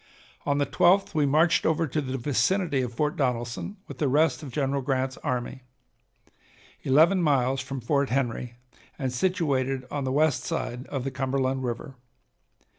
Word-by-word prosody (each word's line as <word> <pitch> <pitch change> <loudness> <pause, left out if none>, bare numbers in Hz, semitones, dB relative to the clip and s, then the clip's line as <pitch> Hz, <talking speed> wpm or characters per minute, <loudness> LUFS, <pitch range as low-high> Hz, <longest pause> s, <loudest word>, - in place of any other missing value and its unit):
On 145 0 +2
the 145 - +2
12th 175 +7 +3
we 150 -2 +2
marched 160 +4 +3
over 160 +1 +2
to 155 +1 -2
the 130 -1 -3
vicinity 145 +4 +1
of 125 -2 -3
Fort 150 +7 -1
Donelson 125 - -2
with - - -9
the 150 - +2
rest 150 +5 +2
of 145 -4 -8
General 140 +1 0
Grant's 130 0 -1
army, 125 +1 -3 1.2
eleven 160 +8 +4
miles 135 -4 +2
from 135 0 -6
Fort 140 +3 +1
Henry, 125 -2 -2 0.4
and 130 -3 -2
situated 135 -5 0
on 145 -1 -2
the 130 - -1
west 150 0 +2
side 125 +2 -4
of 135 -3 -3
the 135 - -3
Cumberland 130 0 -1
River. 125 +3 -5
135 Hz, 160 wpm, -26 LUFS, 130-150 Hz, 1.2 s, eleven